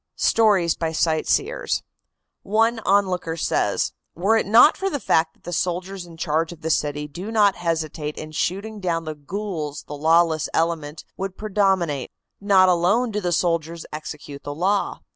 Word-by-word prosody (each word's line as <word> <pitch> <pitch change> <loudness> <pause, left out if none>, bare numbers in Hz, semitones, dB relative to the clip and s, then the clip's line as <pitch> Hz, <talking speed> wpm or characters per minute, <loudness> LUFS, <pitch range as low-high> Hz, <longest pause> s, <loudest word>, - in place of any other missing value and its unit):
STORIES 200 -7 +3
BY 160 -1 -3
SIGHTSEERS. 165 - 0 0.6
One 225 +3 +1
onlooker 185 -4 +1
says: - - 0 0.2
"Were 195 +6 +2
it 225 - +1
not 230 +8 +7
for 390 - -2
the 290 - -3
fact 160 -6 +1
that - - -34
the 175 - -6
soldiers 180 +1 -2
in 165 -1 -13
charge 160 +1 0
of 165 -2 -12
the 160 - -1
city 150 -1 -1
do 180 +9 -7
not 205 -3 +4
hesitate 160 -3 -3
in 155 0 -7
shooting 200 +7 -2
down 170 -3 -1
the 155 - -4
ghouls 155 -1 -5
the - - -9
lawless 160 +1 +3
element 160 -2 -1
would 190 -1 -4
predominate. 190 - 0 0.3
Not 195 -2 +5
alone 185 +7 +2
do 210 0 -2
the 175 -2 -1
soldiers 165 -1 -1
execute 150 -2 -7
the 145 - -6
law. 195 +5 0
175 Hz, 160 wpm, -23 LUFS, 160-200 Hz, 0.6 s, not